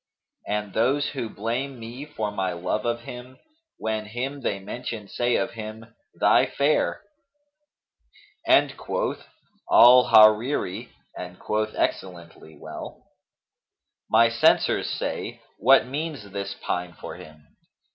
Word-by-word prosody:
And 105 -1 -3
those 135 +6 +1
who 125 -5 -4
blame 120 +6 -4
me 120 +5 -8
for 110 -9 -4
my 95 -3 -2
love 90 +5 -3
of 120 0 -1
him, 125 +2 -10 0.2
* 325 0 -50
When 110 -1 -3
him 130 +6 -5
they 100 - -1
mention 105 +1 -6
say 120 +4 0
of - - 0
him, 110 0 -9 0.2
'Thy - - +4
Fair'!' 145 +2 +1 1.5
And - - +4
quoth - - -3 0.4
al 125 +1 +8
Hariri[FN#238] 110 0 +4 0.3
and 90 0 -8
quoth 110 0 -2
excellently 85 -3 -4
well, 80 -1 -9 1.1
'My 115 +1 +6
censors 115 0 +2
say, - - -4 0.2
'What 135 -1 +5
means 140 -6 -5
this 100 0 -4
pine 90 0 -3
for - - -9
him? 75 -1 -15
110 Hz, 125 wpm, -25 LUFS, 100-125 Hz, 1.5 s, al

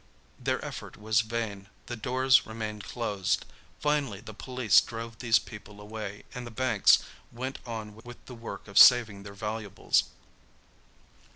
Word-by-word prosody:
Their - - -1
effort - - -8
was 110 0 +2
vain; 110 -3 -4 0.2
the 120 - -5
doors 130 +3 +3
remained 110 -2 -5
closed; 105 -6 -1 0.3
finally 145 -9 0
the 110 - -10
police 125 -2 +3
drove 115 -1 -7
these 115 -2 +4
people 105 0 -9
away, 105 -1 -7
and 125 -1 -6
the - - -6
banks 115 -2 +4 0.3
went 130 +3 -5
on 110 -2 -6
with 120 +3 -13
the 125 - -10
work 115 -2 -8
of 100 0 +3
saving 115 -5 +7
their 100 0 -10
valuables. 105 -1 0
110 Hz, 145 wpm, -29 LUFS, 105-120 Hz, 0.3 s, saving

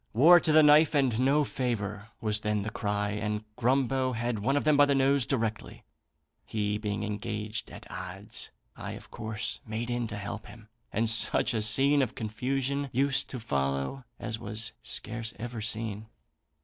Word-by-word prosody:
'War 165 +10 +8
to 160 - 0
the 155 0 +7
knife, 150 +1 +6
and 130 -5 +2
no 140 +4 +3
favour,' 105 -6 -3
was 105 -1 0
then 105 -1 0
the 110 - -4
cry; 105 -1 -1
and 105 0 -2
Grumbo 130 +1 +1
had 115 -1 -2
one 135 +7 +1
of - - 0
them 155 -1 +4
by 145 0 +7
the 140 - +2
nose 135 -2 +3
directly. 110 -5 -2 0.6
He 105 -1 -2
being 105 -1 -3
engaged 105 +1 -4
at - - -11
odds, 95 +3 -7 0.3
I - - -6
of - - -11
course 110 -1 -4
made 115 +2 -4
in 120 -1 -1
to 105 -2 -6
help 105 +2 -6
him, 110 +1 -14 0.2
and 115 +2 +1
such 115 +3 +4
a 110 - 0
scene 135 +7 +4
of 130 - -1
confusion 135 +5 -2
used 135 +2 +1
to 125 - -5
follow 70 - -2 0.2
as 110 -1 -4
was 110 0 -1
scarce 115 0 -3
ever 115 0 -5
seen. 110 -1 -3
115 Hz, 175 wpm, -29 LUFS, 105-135 Hz, 0.6 s, War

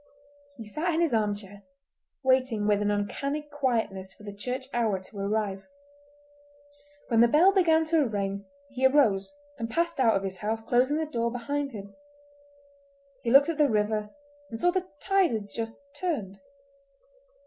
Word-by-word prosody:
He 225 - -8
sat 315 - -2
in 330 - +1
his 325 -7 +1
arm 210 -2 +2
chair, 205 0 -12 0.6
waiting 260 -5 +2
with 205 -1 +2
an 205 - +1
uncanny 275 +9 -2
quietness 235 -10 -2
for - - -17
the 205 -1 -7
church 250 +6 -4
hour 220 -5 +1
to 195 +2 -11
arrive. 200 -1 -2 1.4
When 230 -2 +4
the 235 - +7
bell 325 +10 +5
began 325 -4 +4
to 315 -3 +2
ring 200 -2 -3 0.3
he 265 0 +3
arose 225 -8 +2 0.3
and 230 0 -3
passed 335 +2 -1
out 230 -4 +4
of 195 - 0
his 190 -1 -4
house, 220 +3 -2
closing 255 +6 +2
the 315 - 0
door 235 -6 -1
behind 280 +4 -3
him. 200 -3 -9 1.3
He 235 - -2
looked 275 +5 +6
at 320 -2 -3
the 295 -2 +5
river 210 -1 0 0.4
and 225 - -5
saw 355 +9 +3
the 370 0 -2
tide 390 -6 +2
had 205 -2 -4
just 225 +1 -5
turned. 285 - -3
230 Hz, 165 wpm, -27 LUFS, 205-290 Hz, 1.4 s, the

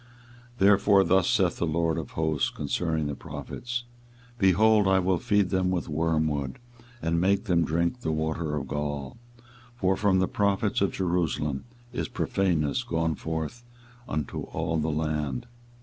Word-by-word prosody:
24:023:015 - - -26
Therefore 100 0 +5
thus 95 0 +3
saith 95 -8 +2
the 85 - 0
LORD 80 0 +1
of - - -7
hosts 80 -2 0
concerning 80 +1 -1
the 75 - -2
prophets; 120 - -5 0.6
Behold, 105 +2 +5
I 95 0 +4
will 95 -1 +2
feed 105 -6 +2
them 95 -1 +1
with 90 -2 -1
wormwood, 80 -3 0 0.5
and 85 +1 +1
make 100 +2 +2
them 90 -6 +2
drink 85 +9 0
the 80 - -2
water 80 0 -1
of 70 -2 -3
gall: 75 - -4 0.6
for 95 -5 +1
from 95 0 +2
the 95 0 +2
prophets 100 0 +1
of 100 - +2
Jerusalem 85 -6 -1 0.3
is - - -2
profaneness 80 -7 0
gone 80 -1 0
forth 80 +10 -4 0.5
into 75 -3 -3
all 80 - -2
the 80 +1 0
land. 75 - -2
85 Hz, 150 wpm, -27 LUFS, 80-95 Hz, 0.6 s, Therefore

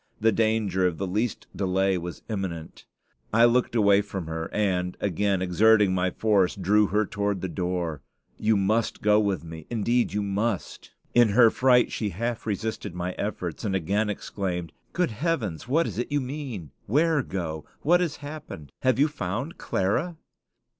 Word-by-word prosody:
The 115 +1 +4
danger 110 -4 +1
of 85 -3 -3
the 95 - -2
least 105 +5 -2
delay 95 0 +1
was 90 -1 -6
imminent. 95 -7 -5 0.4
I 115 +2 +6
looked 120 0 +2
away 100 -2 +5
from 95 -3 -5
her, 80 0 -4
and, 90 -4 0
again 100 0 0
exerting 105 +2 +4
my 95 0 +1
force, 100 -2 +2
drew 105 +2 +3
her 105 +3 +1
toward 100 -2 -2
the 95 - -2
door. 90 -4 -3 0.4
"You 110 0 +3
must 105 +3 0
go 105 0 +5
with 100 -5 0
me; 80 -2 -9
indeed 120 +1 +1
you 105 +1 -1
must." 100 +1 -2 0.2
In 120 -2 +5
her 115 +2 +6
fright 125 -1 +4
she 105 - -2
half 115 +5 -3
resisted 105 -2 -3
my 90 +1 -2
efforts, 90 -4 -4
and 100 -3 -1
again 100 +5 0
exclaimed, 90 -4 -4 0.2
"Good 180 -7 0
heaven! 115 - -1
what 160 +6 +2
is - - -4
it 120 - -3
you 145 - +2
mean? 130 - -6 0.2
Where 155 +5 +3
go? 80 -9 -4 0.2
What 175 +3 +4
has 165 -5 -1
happened? 145 - -8
Have 130 -2 +2
you 145 +3 +4
found 130 - -4
Clara?" 135 - -1
105 Hz, 165 wpm, -26 LUFS, 90-120 Hz, 0.4 s, I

